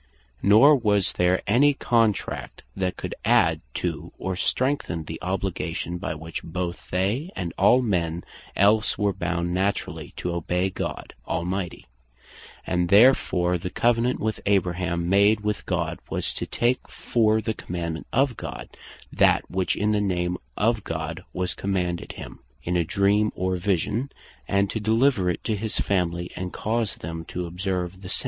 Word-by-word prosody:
Nor 130 +9 +7
was 105 -5 +2
there 90 +1 +2
any 140 +7 +4
Contract, 115 -6 0
that 95 -1 -2
could - - -4
adde - - +3
to, - - -3
or 95 -1 -3
strengthen 125 - 0
the 80 +1 -7
Obligation, 90 -2 -3
by 80 - -3
which 80 +2 -6
both 90 +1 -5
they, 100 - 0
and 85 -3 -4
all 125 +6 +5
men 85 -6 -1 0.3
else 105 +3 +3
were 100 0 +1
bound 90 -2 -2
naturally 95 +2 -2
to 90 - -2
obey 90 +2 0
God - - -5
Almighty: 90 +1 -3 0.8
And 90 -1 0
therefore 95 -5 +5
the 90 - -4
Covenant 120 +4 +1
which 110 0 -2
Abraham 90 -3 +1
made 100 +3 +4
with 105 -1 -2
God, - - -1
was - - -1
to - - -4
take 120 +2 0
for 110 -2 +1
the 110 +1 -2
Commandement 85 -5 -5
of 130 0 +2
God, - - -7 0.4
that - - +3
which 95 0 0
in 105 +1 +1
the 105 -1 +2
name 90 -3 0 0.2
of 115 0 +1
God 80 0 -4
was 90 -1 -2
commanded 90 -3 -2
him, - - -9 0.2
in 90 - -1
a 85 - +3
Dream, 100 +5 +2
or 95 0 -1
Vision, 100 - -1 0.4
and 100 0 +2
to 110 - -2
deliver 110 -2 +2
it 90 - -2
to 110 - 0
his 110 +1 -4
family, 85 -2 0
and 90 0 -4
cause 110 -1 -1
them 80 +1 -6
to 90 +1 -4
observe 90 +1 -3
the 90 - -8
same. - - +1
95 Hz, 155 wpm, -25 LUFS, 90-105 Hz, 0.8 s, Nor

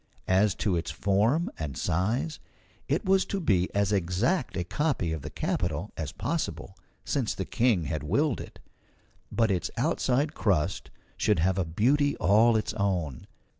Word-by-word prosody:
As 100 +2 +3
to 100 -5 0
its 85 0 -2
form 110 - +1
and 75 -4 -4
size, 115 - -1 0.5
it - - 0
was 190 0 +4
to 200 - -3
be 95 - +2
as 100 0 +2
exact 100 - 0
a 90 - 0
copy 135 - -1
of 80 - -4
the - - -6
capitol - - -2
as - - -4
possible, - - -3 0.3
since - - -1
the - - -3
King 115 -8 +2
had 75 -2 -3
willed 120 - 0
it; - - -11 0.7
but 115 -3 +2
its 90 -2 -1
outside 140 +4 +1
crust 95 - 0 0.3
should 105 - +2
have 90 +3 +1
a 90 - +1
beauty 135 - +2
all 110 +5 +4
its 110 - -2
own. 90 - -2
100 Hz, 160 wpm, -28 LUFS, 90-130 Hz, 0.7 s, was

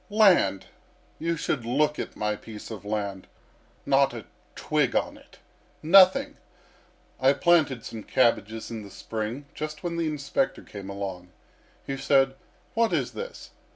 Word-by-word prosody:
"Land! 190 - +4 0.5
You 165 +1 -1
should 140 -4 -1
look 150 +6 +1
at - - -5
my 105 0 -1
piece 110 +1 -10
of 105 -4 -7
land. 100 -2 -3 0.6
Not 135 -2 +3
a 115 - -7 0.3
twig - - 0
on - - 0
it - - -18 0.5
nothing. 185 +3 +6 0.8
I 130 +1 +5
planted 150 -8 +2
some 110 - -6
cabbages 110 -2 +1
in 115 -1 -5
the 100 - -10
spring, 110 +7 -5
just 155 +1 -6
when 170 -1 -3
the 165 -1 0
inspector 150 - -1
came 100 -2 -9
along. 95 -2 -6 0.6
He 135 - -3
said: 135 0 +3 0.4
'What 230 0 +2
is - - 0
this? 485 +1 -8
135 Hz, 145 wpm, -26 LUFS, 105-155 Hz, 0.8 s, nothing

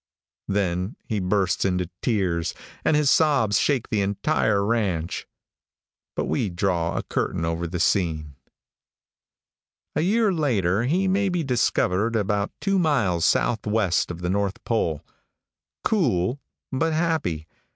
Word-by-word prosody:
Then 95 0 -1
he 110 -3 -2
bursts 95 0 +1
into 90 -2 0
tears, 90 -8 0 0.3
and 150 - +3
his 150 -2 +3
sobs 135 -11 +3
shake 140 -5 +1
the 105 - +2
entire 100 0 +1
ranch. 100 -7 -1 0.9
But - - -1
we 85 +7 0
draw 85 -2 0
a - - -1
curtain 85 - -2
over 85 +1 -2
the 90 +1 -4
scene. 80 -5 0 1.6
A - - +2
year 210 +3 +2
later 115 - +1
he 180 +8 +1
may 195 +1 +2
be 175 -2 -1
discovered 115 -4 +1
about 100 -1 0
two 195 -1 +1
miles 110 - +2
southwest 105 -5 +1
of 90 0 -6
the 90 - -2
north 100 0 -1
pole. 85 -10 -1 0.8
Cool, 125 - +1 0.3
but 160 +4 0
happy. 155 - -1
105 Hz, 130 wpm, -24 LUFS, 90-140 Hz, 1.6 s, and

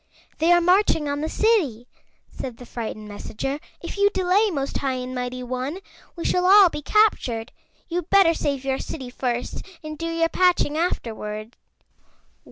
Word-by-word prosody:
"They 325 +2 +4
are 350 0 +6
marching 360 -3 +3
on 285 0 -2
the 315 - -2
City," 320 - +1 0.4
said 250 -3 -6
the 245 - -11
frightened 220 -3 -6
messenger. 220 +7 -4 0.2
"If 340 - -6
you 405 0 +5
delay, 380 +2 +2
Most 280 -6 -2
High 270 -2 -1
and 255 0 -5
Mighty 250 0 -4
One, 255 +6 -3 0.4
we 340 - -6
shall 360 0 +2
all 395 -1 +8
be 300 - -6
captured. 270 - +2 0.4
You'd 350 -1 -3
better 390 -4 +6
save 280 -4 -2
your 265 0 0
City 260 -5 -6
first 245 -1 -3 0.2
and 310 -1 -7
do 330 - -2
your 330 0 +1
patching 360 -5 +2
afterward." 220 -9 -3
295 Hz, 165 wpm, -23 LUFS, 250-355 Hz, 0.4 s, all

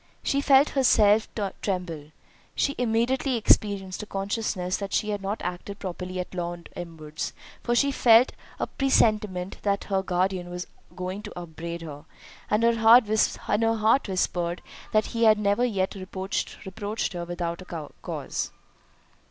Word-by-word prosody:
She 280 - +1
felt 280 0 +5
herself 220 -5 +4 0.3
tremble—she 180 - -4
immediately 245 +3 +1
experienced 200 -3 +2
a 210 - -8
consciousness 195 -2 -2
that 200 -1 -5
she 210 - +1
had 205 -1 -3
not 200 +2 -3
acted 180 +3 -5
properly 185 -1 -5
at 180 - -5
Lord 175 -1 -5
Elmwood's; 155 -3 -6 0.3
for 240 - 0
she 280 +3 +3
felt 240 -1 +6 0.3
a - - +1
presentiment 210 -8 +1
that 200 -1 0
her 190 - +3
guardian 185 -1 -1
was 180 0 -5 0.3
going 185 +2 -4
to 210 -4 -8
upbraid 170 0 -6
her, 145 -1 -9 0.4
and 210 +2 +2
her 235 0 +4
heart 225 +2 +7 1.0
whispered 175 -2 -1 0.3
that 215 0 +3
he 230 -1 0
had 215 -1 +6
never 205 +3 +1
yet 195 -6 0
reproached 195 +2 -4
her 175 -1 -4
without 170 0 -4
a 165 -5 -7
cause. - - -3
195 Hz, 135 wpm, -26 LUFS, 180-220 Hz, 1.0 s, heart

